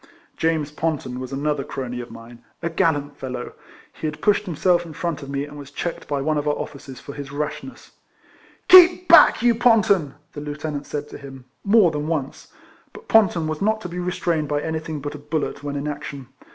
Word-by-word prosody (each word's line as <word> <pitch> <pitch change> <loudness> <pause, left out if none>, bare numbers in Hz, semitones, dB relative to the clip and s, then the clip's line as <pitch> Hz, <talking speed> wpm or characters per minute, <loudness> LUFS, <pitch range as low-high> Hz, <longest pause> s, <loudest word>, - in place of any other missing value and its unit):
James 160 -3 0
Ponton 150 -5 -3
was 130 0 -6
another 145 +1 -1
crony 125 -3 -5
of 120 - -9
mine 115 +1 -13 0.2
(a 170 - -1
gallant 145 -5 0
fellow!); 125 -2 -6 0.4
he 155 - -4
had 150 0 -5
pushed 210 +3 +2
himself 175 0 +1
in 165 -2 -10
front 165 -1 -3
of 140 - -9
me, 140 0 -2
and 145 0 -11
was 140 -1 -10
checked 170 +4 -5
by 145 -1 -1
one 155 0 +1
of 145 - -4
our 150 - +2
officers 135 -2 -8
for 140 - -9
his 140 -1 -7
36 140 - -12
RECOLLECTIONS 150 - -4
OF - - -18
raslmess. - - -26
"Keep 360 0 +8
back, 330 -7 +7
you 240 -1 +5
Ponton!" 215 - +3 0.2
the 145 - -7
lieutenant 150 0 -5
said 145 0 -4
to - - -9
him, 135 -2 -11 0.2
more 200 -4 +5
than 150 0 -3
once. 150 -5 -3 0.5
But - - -13
Ponton 190 -7 +4
was 155 -1 -4
not 215 +2 +1
to 180 - -6
be 175 +1 -5
restrained 175 -3 -1
by 145 0 -1
anything 160 -1 -4
but 145 +1 -5
a 150 - -8
bullet 150 0 -3
when 145 0 -4
in 140 +1 -3
action. 140 -3 -6
150 Hz, 215 wpm, -22 LUFS, 140-170 Hz, 0.5 s, Keep